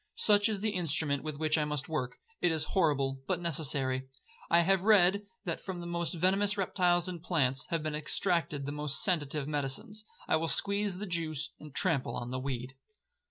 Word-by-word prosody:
Such 205 Hz, 0 st, +4 dB
is 205 Hz, -3 st, -2 dB
the 215 Hz, 0 st, +1 dB
instrument 160 Hz, -6 st, 0 dB
with 155 Hz, -2 st, -5 dB
which 155 Hz, +1 st, +2 dB
I 150 Hz, -, +1 dB
must 150 Hz, -2 st, -2 dB
work.—It 160 Hz, -, -2 dB
is 160 Hz, -1 st, +2 dB
horrible, 140 Hz, -7 st, +1 dB
but 185 Hz, -2 st, 0 dB
necessary. 135 Hz, -5 st, -1 dB, 0.4 s
I 170 Hz, +1 st, +6 dB
have 190 Hz, +2 st, +3 dB
read, 200 Hz, -1 st, +4 dB, 0.2 s
that 170 Hz, -3 st, -3 dB
from 185 Hz, -2 st, -5 dB
the 175 Hz, -, -6 dB
most 170 Hz, 0 st, -2 dB
venomous 195 Hz, +4 st, +2 dB
reptiles 180 Hz, -2 st, +2 dB
and 175 Hz, -3 st, -5 dB
plants, 135 Hz, -7 st, 0 dB
have 165 Hz, -2 st, -1 dB
been 155 Hz, -1 st, -2 dB
extracted 150 Hz, -1 st, 0 dB
the 145 Hz, -, -3 dB
most 150 Hz, -1 st, 0 dB
sanative 150 Hz, -6 st, 0 dB
medicines. 150 Hz, +9 st, -3 dB, 0.2 s
I -, -, +3 dB
will 165 Hz, +1 st, -1 dB
squeeze 200 Hz, +5 st, +1 dB
the 205 Hz, -, -4 dB
juice, 160 Hz, -4 st, -2 dB
and 150 Hz, -, -11 dB
trample 155 Hz, -3 st, 0 dB
on 120 Hz, 0 st, -4 dB
the 130 Hz, -, -2 dB
weed. 130 Hz, -1 st, -4 dB
160 Hz, 185 wpm, -31 LUFS, 145-185 Hz, 0.4 s, I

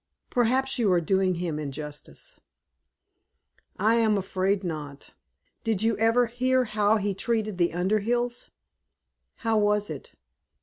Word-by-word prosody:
"Perhaps 255 Hz, +2 st, +1 dB
you 215 Hz, -5 st, +3 dB
are 180 Hz, -, +4 dB
doing 185 Hz, +2 st, +1 dB
him 170 Hz, -3 st, -3 dB
injustice." 150 Hz, 0 st, -6 dB, 1.4 s
"I 220 Hz, +4 st, +3 dB
am 220 Hz, -2 st, +3 dB
afraid 190 Hz, +1 st, 0 dB
not. 150 Hz, -5 st, -6 dB, 0.5 s
Did 220 Hz, -3 st, 0 dB
you 225 Hz, -1 st, +2 dB
never 230 Hz, +2 st, +3 dB
hear 255 Hz, +2 st, +1 dB
how 215 Hz, -1 st, +2 dB
he 205 Hz, -1 st, -1 dB
treated 215 Hz, -2 st, -1 dB
the 175 Hz, 0 st, +4 dB
Underhills?" 215 Hz, +7 st, 0 dB, 0.9 s
"How 225 Hz, -2 st, +1 dB
was 210 Hz, -2 st, +1 dB
it?" 145 Hz, -, -8 dB
210 Hz, 125 wpm, -26 LUFS, 180-230 Hz, 1.4 s, are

